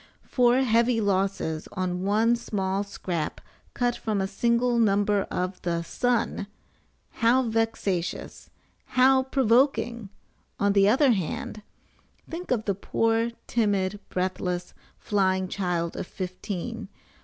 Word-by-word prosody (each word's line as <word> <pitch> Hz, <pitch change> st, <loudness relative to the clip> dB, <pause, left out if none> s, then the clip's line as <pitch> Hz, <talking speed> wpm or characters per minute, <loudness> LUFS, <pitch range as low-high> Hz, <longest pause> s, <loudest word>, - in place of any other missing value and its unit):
FOUR 250 Hz, +1 st, +3 dB
HEAVY 235 Hz, 0 st, +3 dB
LOSSES 195 Hz, -6 st, -1 dB
ON 180 Hz, -2 st, -2 dB
ONE 215 Hz, +4 st, +3 dB
SMALL 195 Hz, -4 st, -2 dB
SCRAP 175 Hz, -5 st, -4 dB, 0.4 s
CUT 245 Hz, -1 st, +1 dB
FROM 215 Hz, -2 st, -2 dB
A 190 Hz, -, +1 dB
SINGLE 235 Hz, +3 st, +1 dB
NUMBER 205 Hz, -2 st, +2 dB
OF 180 Hz, +1 st, -3 dB
THE 170 Hz, -1 st, -1 dB
"SUN!" 240 Hz, +1 st, -1 dB, 0.7 s
HOW 240 Hz, +3 st, +4 dB
VEXATIOUS! 225 Hz, -6 st, -2 dB, 0.5 s
HOW 260 Hz, +1 st, +6 dB
PROVOKING! 240 Hz, -3 st, +1 dB, 0.5 s
ON 200 Hz, 0 st, +3 dB
THE 200 Hz, 0 st, +5 dB
OTHER 265 Hz, +4 st, +4 dB
HAND, 210 Hz, +1 st, -3 dB, 0.7 s
THINK 345 Hz, +2 st, -7 dB
OF 230 Hz, -4 st, 0 dB
THE 200 Hz, -, +1 dB
POOR, 225 Hz, +4 st, 0 dB, 0.2 s
TIMID, 205 Hz, -3 st, 0 dB
BREATHLESS, 180 Hz, -1 st, -2 dB, 0.2 s
FLYING 190 Hz, -2 st, +1 dB
CHILD 175 Hz, -4 st, -2 dB
OF -, -, -5 dB
FIFTEEN! 195 Hz, +3 st, -5 dB
205 Hz, 115 wpm, -26 LUFS, 190-235 Hz, 0.7 s, HOW